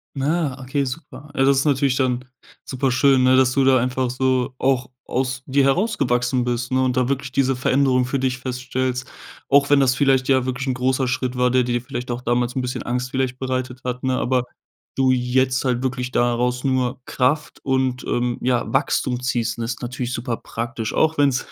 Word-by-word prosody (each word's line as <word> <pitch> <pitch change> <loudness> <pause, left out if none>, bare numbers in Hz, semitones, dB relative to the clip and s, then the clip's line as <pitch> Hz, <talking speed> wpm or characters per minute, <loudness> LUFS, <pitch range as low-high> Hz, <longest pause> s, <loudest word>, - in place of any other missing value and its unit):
Ah, 145 0 -1
okay, 135 +2 -1
super. 140 +1 -8
Also, 135 -1 +3
das 135 - +2
ist 135 - 0
natürlich 140 -2 +2
dann 125 -1 0 0.4
super 130 0 -1
schön, 130 +1 +4
ne, 130 0 +5
dass 130 -1 +4
du 135 - +2
da 130 0 +5
einfach 125 +1 -1
so 130 0 0
auch 130 -2 +1 0.2
aus 130 0 -2
dir 140 +1 +2
herausgewachsen 130 - +1
bist, 125 0 -2
ne, 130 0 +2
und 130 -1 0
da 125 -1 +2
wirklich 135 0 -2
diese 135 -1 +1
Veränderung 130 0 +2
für 125 +3 -1
dich 130 -1 -1
feststellst, 130 0 -3 0.4
auch 140 0 +4
wenn 145 -1 +5
das 130 -2 +3
vielleicht, 135 -1 +2
ja, 130 -2 +3
wirklich 130 +1 -3
'n 130 - +1
großer 130 +1 0
Schritt 130 0 -2
war, 125 0 +2
der 130 0 +3
dir 120 0 -1
vielleicht 125 -1 -6
auch 120 +1 -4
damals 120 0 0
'n 130 - 0
bisschen 125 0 -4
Angst 125 +1 -3
vielleicht 130 -1 -1
bereitet 130 -1 -3
hat, 125 0 -3
ne? 130 -1 +1
Aber 125 0 +1 0.5
du 130 -1 +3
jetzt 130 +1 +1
halt 125 -1 0
wirklich 125 -1 -2
daraus 125 0 0
nur 130 -1 0
Kraft 145 +4 0
und, 130 -2 0
ähm, 120 0 -1
ja, 125 -1 +1
Wachstum 130 -2 0
ziehst, 120 -3 -1
ist 115 +1 -3
natürlich 125 0 -4
super 115 -1 -3
praktisch, 115 -1 -5
auch 160 0 +2
wenn's 140 -3 +2
130 Hz, 200 wpm, -21 LUFS, 125-135 Hz, 0.5 s, ne